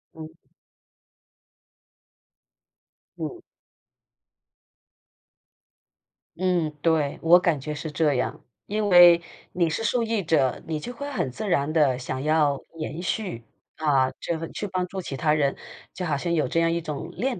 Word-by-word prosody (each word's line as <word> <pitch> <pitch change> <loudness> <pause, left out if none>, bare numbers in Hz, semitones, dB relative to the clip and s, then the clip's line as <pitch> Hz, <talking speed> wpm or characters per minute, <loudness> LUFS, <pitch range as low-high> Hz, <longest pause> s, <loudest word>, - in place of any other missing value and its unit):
嗯。 160 0 -10 2.8
嗯。 360 - -5 3.0
嗯， 180 -4 +1
对， 160 -4 +1
我 170 +2 +7
感 170 -6 0
觉 150 +2 -4
是 155 +1 -5
这 150 -2 +1
样， 125 - -2 0.2
因 210 0 -1
为 175 -2 +8 0.3
你 170 -2 +1
是 225 +8 -2
受 240 0 +1
益 225 -2 0
者， 150 -7 +1
你 155 -2 -3
就 245 - -6
会 285 +4 -6
很 135 - -2
自 205 - -5
然 145 -4 +1
地 145 -6 +3
想 130 +1 -4
要 150 -2 +2 0.2
延 155 +1 -5
续， 185 - -3 0.4
啊， 135 -4 +2
这 165 -1 -3
去 205 - -5
帮 185 -1 -1
助 190 +1 -5
其 140 - -6
他 150 +3 +2
人， 140 -3 +1 0.4
就 180 - -4
好 150 -3 0
像 170 +4 -2
有 155 -4 +2
这 165 +6 0
样 165 0 +3
一 170 - -1
种 155 +1 -5
链 250 +2 -2
160 Hz, 155 characters per minute, -25 LUFS, 150-180 Hz, 3.0 s, 为